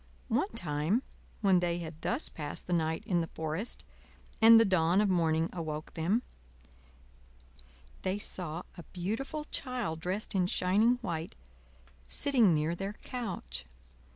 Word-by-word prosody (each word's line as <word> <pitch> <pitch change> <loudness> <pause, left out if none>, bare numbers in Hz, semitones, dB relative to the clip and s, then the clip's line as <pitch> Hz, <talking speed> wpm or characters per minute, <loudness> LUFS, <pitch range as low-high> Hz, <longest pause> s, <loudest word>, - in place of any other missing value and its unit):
One 395 - +1
time 160 - 0 0.4
when 190 -4 +5
they 175 -1 0
had 160 -2 -7
thus 250 +6 0
passed 150 -2 -6
the 180 - -2
night 160 +2 0
in 180 -6 +2
the 165 - -3
forest, 160 +8 -3 0.6
and 225 0 +10
the 225 - +5
dawn 180 -1 +3
of 210 -1 +3
morning 165 -2 +2
awoke 155 -3 -5
them, 190 +9 +1 1.8
they 185 +2 -1
saw 175 -4 -2
a 175 - -8
beautiful 225 - -3
Child 245 - -2
dressed 185 +7 -1
in 185 -2 +2
shining 200 +6 +3
white 165 -4 -3 0.7
sitting 245 - +3
near 155 +1 +1
their 195 +3 -4
couch. 185 - -4
180 Hz, 135 wpm, -31 LUFS, 160-215 Hz, 1.8 s, and